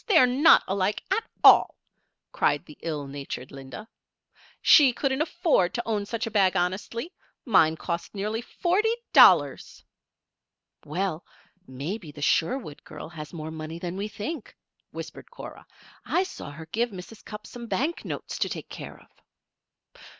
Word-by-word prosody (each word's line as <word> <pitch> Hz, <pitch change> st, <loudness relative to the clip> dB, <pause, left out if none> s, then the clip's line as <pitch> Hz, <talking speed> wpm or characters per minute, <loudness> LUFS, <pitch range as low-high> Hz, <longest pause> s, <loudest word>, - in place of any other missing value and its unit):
They're 330 Hz, -, +6 dB
not 270 Hz, +7 st, +6 dB
alike, 195 Hz, +1 st, -1 dB
at 430 Hz, +4 st, +2 dB, 0.2 s
all," -, -, +7 dB, 0.6 s
cried 145 Hz, -, +1 dB
the 150 Hz, -, -13 dB
ill 150 Hz, -3 st, -3 dB
natured 135 Hz, -1 st, -7 dB
Linda. 135 Hz, +9 st, -9 dB, 0.7 s
"She 275 Hz, -5 st, +7 dB
couldn't 265 Hz, +3 st, 0 dB
afford 315 Hz, -, +1 dB
to 240 Hz, -, -1 dB
own 210 Hz, -3 st, -1 dB
such 230 Hz, +2 st, -2 dB
a 225 Hz, -, -5 dB
bag 195 Hz, -3 st, +3 dB
honestly. 205 Hz, -, -2 dB, 0.3 s
Mine 160 Hz, -, +4 dB
cost 170 Hz, +4 st, -4 dB
nearly 210 Hz, +3 st, -2 dB
forty 370 Hz, -, 0 dB, 0.2 s
dollars." -, -, +5 dB, 1.0 s
"Well, 170 Hz, +2 st, -2 dB, 0.4 s
maybe 150 Hz, -, -5 dB
the 145 Hz, -, -12 dB
Sherwood 165 Hz, -, 0 dB
girl -, -, -9 dB
has 155 Hz, -3 st, -9 dB
more 160 Hz, -2 st, -6 dB
money 160 Hz, +1 st, -6 dB
than 175 Hz, +1 st, -5 dB
we 200 Hz, +2 st, -3 dB
think," 215 Hz, +7 st, -6 dB, 0.3 s
whispered -, -, -9 dB
Cora. -, -, -11 dB, 0.4 s
"I 365 Hz, -, +1 dB
saw 375 Hz, -, -8 dB
her 155 Hz, +3 st, -9 dB
give 235 Hz, +2 st, 0 dB
Mrs. 200 Hz, +2 st, -11 dB
Cupp 210 Hz, 0 st, -9 dB
some 235 Hz, -1 st, -9 dB
bank 305 Hz, +9 st, -1 dB
notes -, -, -5 dB
to -, -, 0 dB
take -, -, -6 dB
care -, -, -9 dB
of." -, -, -21 dB
200 Hz, 150 wpm, -26 LUFS, 160-245 Hz, 1.0 s, all